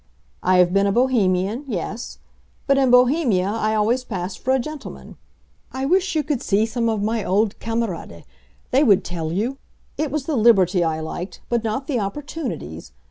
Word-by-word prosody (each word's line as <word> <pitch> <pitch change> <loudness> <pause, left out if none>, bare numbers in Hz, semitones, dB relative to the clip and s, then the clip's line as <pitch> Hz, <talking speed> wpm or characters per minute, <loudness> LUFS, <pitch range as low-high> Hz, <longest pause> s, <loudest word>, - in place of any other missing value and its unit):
I 185 0 +3
have 180 0 +4
been 195 0 +3
a - - +2
Bohemian—yes; 215 - 0 0.5
but 275 -1 +3
in 265 -2 +3
Bohemia 250 - +4
I 215 +1 0
always 230 +4 +1
passed 185 -5 -5
for 260 - -1
a 265 - +4
gentleman. 295 +3 -7 0.6
I 265 +1 -3
wish 370 +4 +1
you 310 - +2
could 290 -4 -2
see 210 +2 +2
some 230 +1 -1
of 215 -2 -1
my 220 0 -1
old 205 +3 0
camarades—they 230 - -3
would 205 -9 +4
tell 165 -3 -4
you! 235 +10 -2 0.4
It 305 -1 0
was 290 -1 -3
the 310 - -1
liberty 195 -6 +4
I 160 -1 -1
liked, 175 +4 -6
but 235 -1 0
not 225 +5 -2
the 275 -5 -1
opportunities! 200 - -5
225 Hz, 170 wpm, -22 LUFS, 190-265 Hz, 0.6 s, have